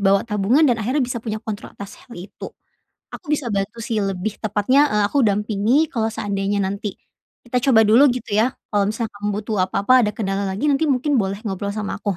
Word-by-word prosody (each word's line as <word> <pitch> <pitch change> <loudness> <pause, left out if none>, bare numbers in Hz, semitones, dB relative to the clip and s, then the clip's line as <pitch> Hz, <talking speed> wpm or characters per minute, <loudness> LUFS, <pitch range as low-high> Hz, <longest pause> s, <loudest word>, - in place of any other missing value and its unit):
bawa 195 0 +3
tabungan, 225 +7 +2
dan 240 -5 +2
akhirnya 255 +6 0
bisa 245 -1 -4
punya 215 -1 -4
kontrol 210 -2 -7
atas 200 0 -10
hal 245 - -16
itu. 180 +3 -9 0.6
Aku 340 - -10
bisa 285 -6 -1
bantu 210 +3 -3
sih 225 -3 -1
lebih 195 +1 -3
tepatnya, 220 +7 +2
eee, 210 -5 +1
aku 285 - +3
dampingi, 215 +6 +1
kalau 225 -3 0
seandainya 205 -2 -2
nanti 200 +1 -4 0.5
kita 250 +1 -1
coba 220 -3 +6
dulu 235 +7 +6
gitu 245 -4 -3
ya. 235 - +3 0.2
Kalau 205 -1 +2
misal 225 +2 -2
kamu 205 0 -5
butuh 215 0 -3
apa-apa, 255 +7 +3
ada 210 - +1
kendala 195 -2 -2
lagi, 190 +7 -3
nanti 295 +2 +2
mungkin 280 +2 +1
boleh 195 0 -2
ngobrol 200 -1 -3
sama 210 -1 -4
aku. 200 -4 -2
215 Hz, 200 wpm, -21 LUFS, 200-245 Hz, 0.6 s, coba